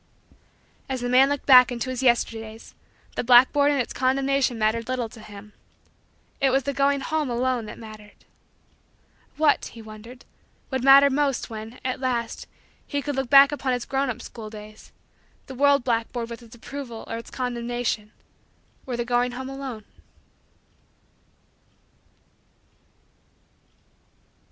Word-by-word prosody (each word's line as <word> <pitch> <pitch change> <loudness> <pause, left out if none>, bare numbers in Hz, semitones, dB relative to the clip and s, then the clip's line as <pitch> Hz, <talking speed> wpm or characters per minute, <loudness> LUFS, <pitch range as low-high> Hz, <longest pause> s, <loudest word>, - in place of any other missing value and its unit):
As 260 -2 -3
the 245 - -2
man 260 +2 +5
looked 285 -1 -3
back 250 -2 +8
into 245 +1 -3
his 255 0 -4
Yesterdays, 225 -3 -1 0.4
the - - -2
blackboard 260 +4 +5
and 285 -1 +1
its 245 - -2
condemnation 265 -1 +1
mattered 225 +2 0
little 255 -2 -1
to 225 - -14
him. 210 -1 -12 0.9
It 270 - +3
was 270 +1 +1
the 280 +2 -2
going 280 0 +1
home 310 0 -1
alone 245 -1 -1
that 210 - -9
mattered. 215 -2 -13 1.1
What, 300 -1 +3
he 230 - -10
wondered, 220 +3 -12 0.5
would 260 -1 -2
matter 275 +1 +7
most 275 -3 -1
when, 220 +2 -8
at 255 0 -2
last, 240 -3 -3 0.4
he 285 -1 -3
could 290 -2 -3
look 265 -2 -2
back 275 0 +8
upon 275 -3 -1
his 245 -1 -3
grown 270 0 -1
up 250 0 -5
school 220 -3 -9
days 215 0 -12 0.5
the 265 - -9
world 280 0 +3
blackboard 235 0 -2
with 235 - -8
its 235 0 -14
approval 240 -1 -8
or 230 - -5
its 230 - -9
condemnation, 240 -3 -3 0.8
or 245 -2 -3
the 240 - -2
going 245 +1 0
home 260 +1 -6
alone? 270 -5 -7
250 Hz, 140 wpm, -24 LUFS, 230-270 Hz, 1.1 s, back